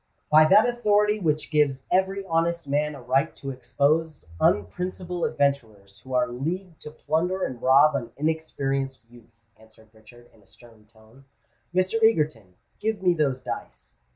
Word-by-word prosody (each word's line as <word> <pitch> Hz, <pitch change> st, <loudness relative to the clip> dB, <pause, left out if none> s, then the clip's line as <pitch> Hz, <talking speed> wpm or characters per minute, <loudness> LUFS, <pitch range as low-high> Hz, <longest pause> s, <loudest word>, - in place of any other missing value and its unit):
"By 155 Hz, +1 st, +7 dB
that 210 Hz, +7 st, +6 dB
authority 210 Hz, -3 st, +2 dB
which 155 Hz, -4 st, -1 dB
gives 140 Hz, -4 st, +1 dB
every 190 Hz, +2 st, +1 dB
honest 170 Hz, -1 st, 0 dB
man 150 Hz, +1 st, -1 dB
a 135 Hz, -, -11 dB
right 130 Hz, +3 st, 0 dB
to 135 Hz, -, -6 dB
expose 145 Hz, -, -1 dB
unprincipled 180 Hz, -, -1 dB
adventurers 115 Hz, -10 st, -2 dB
who 130 Hz, +4 st, -7 dB
are 125 Hz, -1 st, +2 dB
leagued 165 Hz, +8 st, -5 dB
to -, -, -8 dB
plunder 170 Hz, +5 st, -2 dB
and 125 Hz, -2 st, -4 dB
rob 140 Hz, +3 st, +5 dB
an 120 Hz, -4 st, -4 dB
inexperienced 135 Hz, -5 st, -3 dB
youth," 115 Hz, -1 st, -20 dB
answered 110 Hz, 0 st, -22 dB
Richard, 120 Hz, +2 st, -19 dB
in 110 Hz, -, -23 dB
a 100 Hz, -, -27 dB
stern 115 Hz, -2 st, -19 dB
tone. 110 Hz, +4 st, -21 dB, 0.5 s
"Mr. 185 Hz, +5 st, 0 dB
Egerton, 150 Hz, -, +1 dB, 0.2 s
give 215 Hz, -2 st, -2 dB
me 180 Hz, -1 st, +4 dB
those 140 Hz, -5 st, -1 dB
dice." -, -, -8 dB
145 Hz, 155 wpm, -25 LUFS, 120-170 Hz, 0.5 s, By